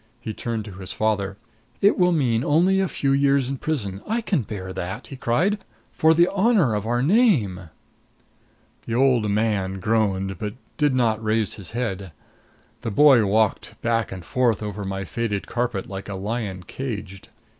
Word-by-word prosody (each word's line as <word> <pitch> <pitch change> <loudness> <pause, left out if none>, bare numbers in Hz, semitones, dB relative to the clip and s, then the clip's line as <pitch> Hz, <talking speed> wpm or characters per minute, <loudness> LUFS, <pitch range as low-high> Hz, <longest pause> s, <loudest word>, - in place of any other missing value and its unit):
He 110 - -5
turned 115 -1 -4
to 105 - -8
his 95 0 -8
father. 100 -3 -1 0.4
"It 200 - +4
will 180 -1 +3
mean 125 -8 +1
only 175 +7 +3
a 190 - +2
few 140 -5 -1
years 140 -1 +3
in 135 +1 -3
prison 105 -11 -3
I 230 +2 0
can 195 - 0
bear 95 -4 -6
that!" 90 +2 -5
he 135 - -9
cried. 170 - +1 0.3
"For 160 +1 +4
the 170 +2 +5
honor 200 - +3
of 105 +1 -2
our 120 +1 +1
name!" 135 - +2 1.2
The 115 - -2
old 125 -4 +3
man 100 -3 0
groaned, 95 -3 0
but 105 0 -4 0.2
did 145 -4 +2
not 115 -3 +1
raise 110 -1 0
his 100 -4 -8
head. 95 -7 -3 0.7
The - - -3
boy 125 -2 +6
walked 110 +1 0
back 115 -2 0
and 90 -3 -7
forth 120 -5 +1
over 105 -1 -4
my 95 0 -3
faded 105 -2 -2
carpet 120 -4 -2
like 95 -2 -7
a 100 - -4
lion 100 -2 -4
caged. 105 -6 -6
115 Hz, 170 wpm, -23 LUFS, 100-135 Hz, 1.2 s, boy